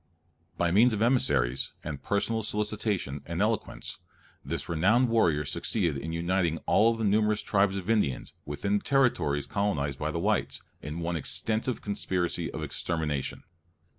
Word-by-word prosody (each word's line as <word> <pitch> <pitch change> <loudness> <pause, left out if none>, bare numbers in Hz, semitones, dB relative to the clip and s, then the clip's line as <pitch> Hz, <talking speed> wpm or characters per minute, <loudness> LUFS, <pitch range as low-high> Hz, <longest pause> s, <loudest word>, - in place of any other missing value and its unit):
By 85 -1 +1
means 115 +6 +5
of 105 +1 +1
emissaries, 65 - +1
and 70 -3 -5
personal 105 +6 0
solicitation, 105 -9 -2
and 85 +1 -3
eloquence, 110 +1 -2 0.4
this - - -3
renowned 105 +10 +3
warrior 85 -10 +2
succeeded 85 +2 0
in 80 +4 -4
uniting 85 0 0
all 115 +2 +4
the 115 - -3
numerous 105 +1 +2
tribes 100 -1 +2
of 95 -1 -5
Indians 105 - 0
within 100 +8 -1
the - - -17
territories 120 - +2
colonized 75 -10 -1
by 75 - -1
the 80 - -3
whites, 85 - 0 0.2
in 75 +4 -5
one 85 +1 -1
extensive 110 - -1
conspiracy 95 -3 -1
of - - -5
extermination. 75 -5 -2
95 Hz, 145 wpm, -28 LUFS, 80-110 Hz, 0.4 s, means